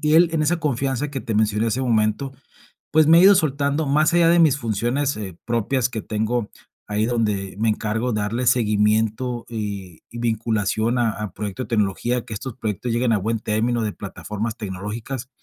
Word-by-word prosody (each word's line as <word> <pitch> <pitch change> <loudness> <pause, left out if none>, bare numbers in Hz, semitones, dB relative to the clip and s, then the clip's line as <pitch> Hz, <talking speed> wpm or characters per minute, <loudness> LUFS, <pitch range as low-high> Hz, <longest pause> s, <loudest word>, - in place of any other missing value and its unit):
y 150 +1 +3
él 170 +1 +6
en 155 -1 +1
esa 170 +3 +1
confianza 140 -1 -1
que 135 -2 -4
te 115 - -4
mencioné 110 +1 +2
hace 125 +4 -1
un 125 -2 -1
momento, 110 +5 +1 0.6
pues 155 -1 +5
me 165 +1 +8
ha - - +6
ido 200 +1 +8
soltando, 145 -2 +1
más 150 +4 +3
allá 170 -1 +5
de 170 +1 +5
mis 155 -4 +5
funciones, 120 +4 -1
eh, 95 -5 -6
propias 120 +2 0
que 115 -3 -4
tengo 110 +1 -2 0.4
ahí 105 +1 0
donde 105 -5 -1
me 110 +1 +1
encargo 110 +3 -1
darle 105 +4 -1
seguimiento 110 +1 +1
y 100 -6 -6
y 120 - -8
vinculación 110 0 0
a 115 -2 +2
a 105 -3 -5
proyectos 105 +4 -5
de - - -14
tecnología, 115 +4 0
que 115 -3 -7
estos 130 +2 -6
proyectos 115 +1 -3
lleguen 120 0 +1
a 105 - +3
buen 110 +3 -2
término 115 +2 0
de 105 -2 -1
plataformas 105 +2 -5
tecnológicas. 110 +6 -5
115 Hz, 190 wpm, -22 LUFS, 105-130 Hz, 0.6 s, me